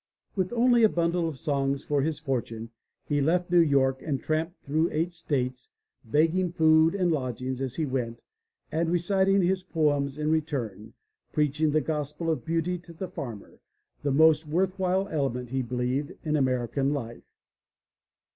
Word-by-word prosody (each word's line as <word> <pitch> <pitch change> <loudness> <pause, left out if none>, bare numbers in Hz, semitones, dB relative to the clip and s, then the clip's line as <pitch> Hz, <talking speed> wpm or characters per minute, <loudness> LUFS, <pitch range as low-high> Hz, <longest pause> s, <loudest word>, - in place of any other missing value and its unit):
With 185 -2 0
only 240 0 +4
a 220 - +7
bundle 170 -1 0
of 150 - -8
songs 140 -1 -1
for 145 -1 +1
his 155 +2 -1
fortune, 115 -6 -3 0.4
he 145 -1 +1
left 175 +4 +1
New 175 - +6
York 135 -4 +3
and 140 -4 -2
tramped 160 +5 -2
through 155 +4 +1
eight 165 +3 -1
states, 130 -6 -3 0.3
begging 165 +9 +2
food 160 0 +4
and 180 -3 +2
lodgings 130 -2 -2
as 130 -2 -3
he 160 - 0
went 120 -4 -3 0.5
and 165 +1 0
re 175 - +3
citing 195 +2 +2
his 185 +1 +1
poems 145 -5 0
in 150 0 0
return, 130 -10 -2 0.4
preaching 150 +1 +1
the 155 +1 +2
gospel 150 +2 -2
of 160 - -2
beauty 165 +2 -1
to 170 -1 -13
the 180 +3 -6
farmer, 120 - -8 0.4
the 145 - 0
most 155 +2 +5
worth 185 +5 0
while 190 +1 +1
element, 125 -5 -2
he 135 0 0
believed, 125 +3 -2
in 155 -1 0
American 130 +1 +1
life. 120 -4 -8
150 Hz, 165 wpm, -27 LUFS, 135-170 Hz, 0.5 s, a